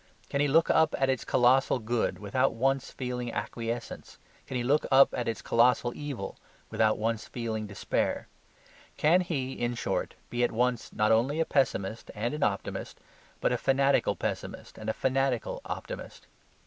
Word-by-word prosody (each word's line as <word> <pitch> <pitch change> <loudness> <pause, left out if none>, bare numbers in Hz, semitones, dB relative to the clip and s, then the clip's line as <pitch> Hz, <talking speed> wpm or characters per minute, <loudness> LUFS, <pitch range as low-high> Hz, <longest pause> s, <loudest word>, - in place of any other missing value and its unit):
Can 140 - +1
he 145 - +3
look 160 +4 +4
up 160 0 +3
at 135 0 +2
its 130 - -2
colossal 130 +2 +3
good 120 0 -1
without 105 +5 0
once 135 +3 +1
feeling 125 -2 -4
acquiescence? 115 0 -5 0.3
Can 130 - -3
he 120 - -1
look 145 +5 +2
up 135 0 +6
at 120 - -2
its 110 -5 -3
colossal 120 +1 +3
evil 140 -10 -5 0.3
without 110 -1 +2
once 110 0 -2
feeling 110 -3 -4
despair? 100 -1 -1 0.7
Can 170 +5 +4
he, 140 -7 -2
in 120 0 -2
short, - - -2 0.2
be 120 0 0
at 120 - +2
once 125 0 0
not 105 0 +2
only 130 +8 +2
a 165 - +3
pessimist 115 -7 0
and 115 +6 -2
an 150 - -4
optimist, 100 -5 -2 0.4
but - - +2
a - - 0
fanatical 135 +1 +2
pessimist - - -5
and 110 0 -4
a - - +1
fanatical 130 -1 0
optimist? - - -7
125 Hz, 165 wpm, -29 LUFS, 115-135 Hz, 0.7 s, up